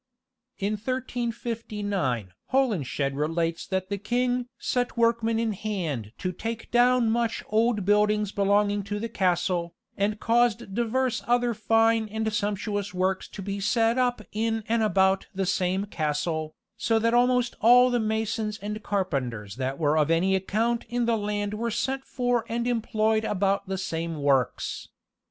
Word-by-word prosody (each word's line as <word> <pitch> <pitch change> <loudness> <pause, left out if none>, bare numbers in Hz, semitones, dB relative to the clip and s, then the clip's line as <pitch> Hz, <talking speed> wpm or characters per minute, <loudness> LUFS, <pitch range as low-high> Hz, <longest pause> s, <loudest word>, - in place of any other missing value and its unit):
In 205 +2 -1
1359 215 - -3 0.2
Holinshed 155 - +1
relates 165 +3 -1
that 190 0 -2
the 200 -1 -2
king 245 +3 0
"set 245 -1 -1
workmen 230 -1 +2
in 225 -1 0
hand 170 - -3
to 185 - -2
take 225 +5 -6
down 245 -1 +4
much 230 -1 0
old 220 -2 +2
buildings 210 0 +2
belonging 205 0 +2
to 205 0 -3
the 230 - -3
castle, 175 -3 0 0.2
and 210 +1 0
caused 230 -4 +1
divers 240 +3 0
other 240 0 +2
fine 225 +1 +2
and 220 0 -2
sumptuous 205 -1 -2
works 185 +1 0
to 195 - -8
be 200 +1 -3
set 230 +4 +2
up 245 -3 +1
in 225 +1 -1
and 230 0 +1
about 195 -2 +2
the 195 0 0
same 185 +1 0
castle, 155 -2 -2 0.2
so 225 - +1
that 230 +1 +2
almost 245 0 +3
all 250 +2 +7
the 245 - +2
masons 220 -1 -1
and 210 +1 -5
carpenters 130 - -2
that 130 +1 -2
were 155 0 +2
of 150 0 +2
any 180 +4 +3
account 225 +5 0
in 240 0 0
the 230 0 +2
land 205 -1 -2
were 230 +2 -2
sent 265 +4 -2
for 245 -2 0
and 235 +1 -1
employed 220 -2 +1
about 200 -1 0
the 190 0 -2
same 165 -3 -3
works." 135 -4 0
210 Hz, 150 wpm, -26 LUFS, 190-230 Hz, 0.2 s, all